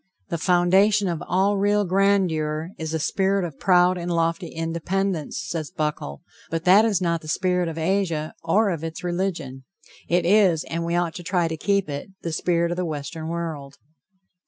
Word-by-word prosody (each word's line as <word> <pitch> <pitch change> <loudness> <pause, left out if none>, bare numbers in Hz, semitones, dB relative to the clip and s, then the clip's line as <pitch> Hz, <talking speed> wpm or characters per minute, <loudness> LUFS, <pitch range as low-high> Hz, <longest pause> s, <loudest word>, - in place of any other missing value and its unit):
"The 170 - -2
foundation 190 +4 +3
of 170 -3 -2
all 195 +3 +2
real 205 +1 +2
grandeur 175 -5 +1
is 160 -1 -4
a 160 - 0
spirit 195 +3 +1
of 155 -5 -8
proud 180 -1 +4
and 175 0 -4
lofty 165 +1 0
independence," 170 +1 -2
says 155 -4 -3
Buckle; 150 - -4 0.3
but 165 0 -2
that 190 +5 +6
is 205 -5 +1
not 170 -2 0
the 155 - -12
spirit 180 +1 0
of 165 - -7
Asia, 165 -3 -1
or 200 +5 +2
of 165 -3 -4
its 165 +1 -6
religion. 175 -7 -3 0.5
It 175 0 +2
is, 185 -4 +4
and 165 0 -4
we 170 +1 -1
ought 175 -2 0
to 175 - -8
try 175 -1 +1
to 160 - -3
keep 200 +3 0
it, 145 +5 -5
the 165 - -3
spirit 170 +1 +1
of 175 - -3
the 180 - -1
Western 155 +1 -5
world. 160 -5 -5
170 Hz, 180 wpm, -24 LUFS, 160-190 Hz, 0.5 s, that